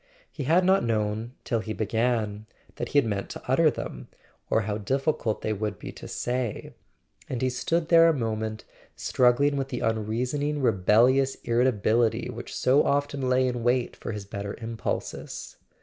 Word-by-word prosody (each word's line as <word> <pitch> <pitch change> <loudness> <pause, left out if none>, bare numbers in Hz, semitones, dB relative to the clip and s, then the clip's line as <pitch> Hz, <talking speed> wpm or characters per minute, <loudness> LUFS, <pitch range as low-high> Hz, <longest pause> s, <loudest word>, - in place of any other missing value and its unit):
He 140 - -5
had 170 +6 +4
not 190 +1 +4
known, 110 +1 -1
till 115 - 0
he 110 0 -4
began, 110 -1 -1 0.3
that - - -3
he - - 0
had 140 - +5
meant 100 -3 -2
to - - -7
utter - - +4
them, - - -6 0.4
or 110 - +3
how 105 0 -3
difficult 130 0 -1
they 110 - 0
would 105 0 -3
be - - -7
to - - -10
say; 120 -2 -3 0.6
and 125 - -2
he 130 - +2
stood 165 +6 -1
there 165 0 +7
a - - +6
moment 110 -5 -3 0.3
strug¬ 125 -1 +3
gling 145 +1 +2
with 135 -1 -1
the 125 -2 -4
unreasoning 125 +7 -1
rebellious 125 +4 +3
irritability 115 -1 +2
which - - -8
so 130 +3 +4
often 140 -2 0
lay 130 0 +3
in 125 -1 -2
wait 120 +1 +1
for - - -6
his 105 -2 -6
better 100 0 -5
impulses. 115 -1 -5
120 Hz, 170 wpm, -26 LUFS, 110-135 Hz, 0.6 s, there